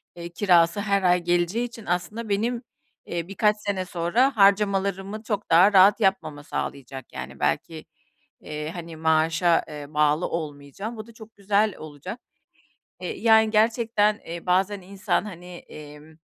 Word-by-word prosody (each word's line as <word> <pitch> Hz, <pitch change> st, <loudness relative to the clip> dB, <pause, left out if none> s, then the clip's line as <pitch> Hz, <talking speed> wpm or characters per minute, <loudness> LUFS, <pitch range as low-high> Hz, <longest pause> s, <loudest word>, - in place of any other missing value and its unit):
eee, 170 Hz, 0 st, -7 dB
kirası 175 Hz, 0 st, +3 dB
her 200 Hz, -1 st, 0 dB
ay 180 Hz, 0 st, +4 dB
geleceği 175 Hz, +7 st, 0 dB
için 230 Hz, -2 st, -10 dB
aslında 180 Hz, +6 st, -3 dB
benim, 230 Hz, +4 st, -1 dB, 0.4 s
eee, 170 Hz, -1 st, -4 dB
birkaç 210 Hz, +2 st, +1 dB
sene 200 Hz, -3 st, -3 dB
sonra 195 Hz, +10 st, +1 dB
harcamalarımı 200 Hz, 0 st, +2 dB
çok 210 Hz, -2 st, -4 dB
daha 180 Hz, +5 st, +6 dB
rahat 195 Hz, +3 st, +6 dB
yapmama 190 Hz, -8 st, 0 dB
sağlayacak, 135 Hz, -2 st, -6 dB
yani, -, -, -8 dB
belki, 160 Hz, -2 st, -2 dB, 0.6 s
eee, 150 Hz, +1 st, -6 dB
hani, 170 Hz, -2 st, -8 dB
maaşa, 160 Hz, +2 st, +2 dB
eee, 150 Hz, -1 st, -8 dB
bağlı 150 Hz, +2 st, +2 dB
olmayacağım, 155 Hz, -, -6 dB
bu 215 Hz, +1 st, -8 dB
da 230 Hz, -, -15 dB
çok 220 Hz, 0 st, -14 dB
güzel 205 Hz, 0 st, +1 dB
olacak. 155 Hz, -, -9 dB, 0.8 s
Eee 440 Hz, -, -5 dB
yani 220 Hz, -1 st, +5 dB
gerçekten, 220 Hz, -1 st, +2 dB
eee, 170 Hz, +1 st, -7 dB
bazen 190 Hz, +3 st, +1 dB
insan 195 Hz, +3 st, -2 dB
hani, 180 Hz, -4 st, -10 dB
emm, 150 Hz, -1 st, -13 dB
190 Hz, 145 wpm, -24 LUFS, 165-210 Hz, 0.8 s, daha